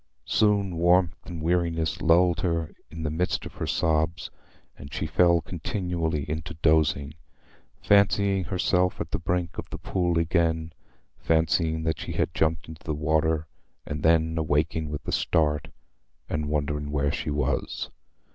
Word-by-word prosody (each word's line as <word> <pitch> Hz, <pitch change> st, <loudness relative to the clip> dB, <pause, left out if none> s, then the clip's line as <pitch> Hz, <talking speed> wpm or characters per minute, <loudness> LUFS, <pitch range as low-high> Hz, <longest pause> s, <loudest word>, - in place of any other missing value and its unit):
Soon 100 Hz, -4 st, +2 dB
warmth 85 Hz, 0 st, +2 dB
and 85 Hz, -3 st, -6 dB
weariness 85 Hz, -2 st, 0 dB
lulled 85 Hz, +1 st, +4 dB
her 85 Hz, -3 st, -1 dB, 0.2 s
in 80 Hz, +1 st, -7 dB
the 75 Hz, -, -1 dB
midst 90 Hz, +4 st, -1 dB
of -, -, -8 dB
her -, -, -4 dB
sobs, 80 Hz, 0 st, 0 dB, 0.4 s
and 70 Hz, -, -11 dB
she 80 Hz, -, -3 dB
fell 85 Hz, +1 st, +4 dB
continually 85 Hz, -, -2 dB
into 80 Hz, +2 st, -4 dB
dozing, 75 Hz, -2 st, +2 dB, 0.7 s
fancying 100 Hz, -2 st, +3 dB
herself 90 Hz, +1 st, +1 dB
at -, -, -4 dB
the -, -, -1 dB
brink 85 Hz, +1 st, -2 dB
of -, -, -6 dB
the -, -, -6 dB
pool 90 Hz, -2 st, 0 dB
again—fancying 80 Hz, 0 st, 0 dB
that 80 Hz, -2 st, -1 dB
she -, -, -5 dB
had -, -, -1 dB
jumped 80 Hz, +1 st, 0 dB
into 80 Hz, -1 st, -11 dB
the 75 Hz, -, -2 dB
water, 80 Hz, +1 st, +1 dB, 0.4 s
and 75 Hz, 0 st, -4 dB
then 80 Hz, 0 st, +3 dB
awaking 80 Hz, 0 st, 0 dB
with 75 Hz, -1 st, -6 dB
a -, -, -1 dB
start, 75 Hz, -2 st, +1 dB, 0.6 s
and 75 Hz, 0 st, -2 dB
wondering 75 Hz, 0 st, -1 dB
where 70 Hz, -1 st, 0 dB
she 75 Hz, -, -3 dB
was. 75 Hz, -2 st, -2 dB
80 Hz, 145 wpm, -26 LUFS, 75-85 Hz, 0.7 s, lulled